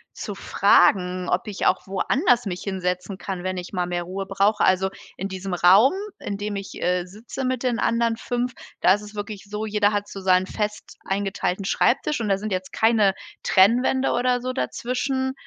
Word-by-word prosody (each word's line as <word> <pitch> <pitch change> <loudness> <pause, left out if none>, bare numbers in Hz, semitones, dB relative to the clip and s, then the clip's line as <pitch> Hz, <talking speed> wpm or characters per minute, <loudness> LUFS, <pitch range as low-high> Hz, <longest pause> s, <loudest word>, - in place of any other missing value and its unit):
zu - - -6
fragen, 180 -1 +3
ob 185 +5 0
ich 200 - -3
auch 185 - +1
woanders 245 - +1
mich 180 -2 -4
hinsetzen 185 -1 -3
kann, 185 -3 -5
wenn 185 0 -2
ich 180 +2 -7
mal 180 -1 -1
mehr 175 0 -2
Ruhe 190 +2 -5
brauche. 200 +2 +2
Also, 190 +1 +3 0.3
in 195 - -3
diesem 190 -1 -4
Raum, 195 - +6 0.3
in 200 -1 -4
dem 205 0 -4
ich, 195 0 -7
äh, 180 0 +1
sitze 225 +7 -7
mit 255 0 -1
den 240 -2 0
anderen 230 0 +1
5, 245 0 -2 0.3
da 185 - +6
ist 205 - -2
es 210 0 -11
wirklich 205 -1 -6
so, 210 +1 -3
jeder 210 -1 +2
hat 205 0 -2
so 195 - -8
seinen 185 0 +3
fest 210 +1 -4
eingeteilten 195 -1 -2
Schreibtisch 265 +5 +1
und 210 - -2
da 195 - +3
sind 210 +1 -5
jetzt 185 0 -3
keine 220 -4 +3 0.3
Trennwände 245 +7 +3
oder 245 0 +1
so 255 +1 -3
dazwischen. 260 +1 -2
200 Hz, 190 wpm, -23 LUFS, 185-230 Hz, 0.3 s, Raum